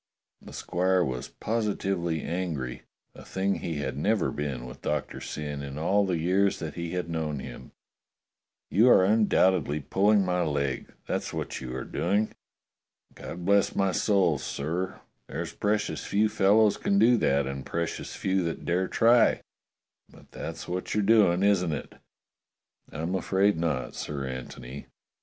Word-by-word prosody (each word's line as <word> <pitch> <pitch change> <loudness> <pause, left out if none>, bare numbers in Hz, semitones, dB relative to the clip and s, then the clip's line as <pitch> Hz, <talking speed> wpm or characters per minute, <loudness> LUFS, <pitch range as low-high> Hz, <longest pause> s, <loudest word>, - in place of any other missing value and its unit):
The - - -12
squire 90 +1 +1
was 65 -3 -4
positively 95 -7 -2
angry, 80 -8 -3 0.3
a - - -12
thing 95 +1 -1
he 85 -2 -3
had 65 -3 -3
never 105 +2 +1
been 70 -4 -4
with 65 +2 -10
Doctor 75 -1 -3
Syn 75 -1 -5
in 70 0 -6
all 95 +6 +2
the 90 -2 0
years 95 +4 +2
that 80 -3 -5
he 85 -1 -5
had 90 -2 -2
known 80 -3 -2
him. 65 -1 -9 1.0
"You 115 +6 +5
are 95 - +6
undoubtedly 95 -7 +3
pulling 100 +7 +3
my 90 -1 +1
leg 70 -5 -1
— - - -41
that's - - -3
what - - -4
you're 65 0 -5
doing. 100 +5 0 0.8
God 85 0 -8
bless 100 +1 +3
my 95 -1 +2
soul, 90 -6 +2
sir, 85 +8 -3 0.3
there's - - -5
precious 105 +1 -1
few 105 +2 +2
fellows 105 +1 +4
can 100 - +1
do 115 +4 +6
that, 70 -8 +2
and 70 0 -5
precious 85 0 -4
few 95 0 0
that 85 - -4
dare 90 +2 +1
try; 115 +1 +4 0.7
but - - -18
that's - - -6
what 90 +3 -3
you're 105 - +2
doing, 100 -4 +4
isn't 90 -5 +3
it?" 70 - -6 1.0
"I'm 80 +4 -3
afraid 95 +2 +2
not. 80 -5 -2
Sir 70 -2 -4
Antony. 65 +1 -7
90 Hz, 150 wpm, -27 LUFS, 75-100 Hz, 1.0 s, are